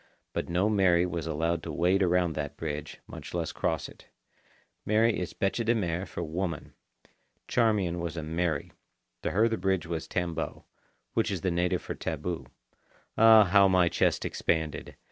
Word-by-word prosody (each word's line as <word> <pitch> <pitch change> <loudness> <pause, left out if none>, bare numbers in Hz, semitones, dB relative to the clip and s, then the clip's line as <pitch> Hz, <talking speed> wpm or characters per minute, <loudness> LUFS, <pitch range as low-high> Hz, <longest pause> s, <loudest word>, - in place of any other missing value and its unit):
But - - -3
no 90 +4 +2
Mary 95 -5 +3
was 85 -2 -4
allowed 80 +1 0
to 80 - -6
wade 90 +5 +2
around 90 -2 +2
that 75 -2 -5
bridge, 75 -2 -5
much - - -9
less 85 -2 -1
cross - - -1
it. - - -16 0.8
"Mary" 110 +2 +2
is 90 -2 -5
bêche 100 +4 0
de 115 +1 +2
mer 90 -3 -2
for - - -5
woman. 85 0 -4 0.7
Charmian 105 -7 +1
was 85 -1 -4
a 80 - -3
Mary. 80 -1 -2 0.5
To - - -1
her 110 +4 +3
the 115 -1 -1
bridge 95 -1 0
was 85 -1 -4
tambo, 85 -3 -3 0.5
which - - +1
is 95 -4 -3
the 90 - 0
native 90 +1 0
for - - -4
taboo. 80 -3 -4 0.7
Ah, 110 -1 +8
how 100 +1 +5
my 90 -2 +4
chest - - +1
expanded! 80 -2 -2
85 Hz, 165 wpm, -28 LUFS, 80-95 Hz, 0.8 s, Ah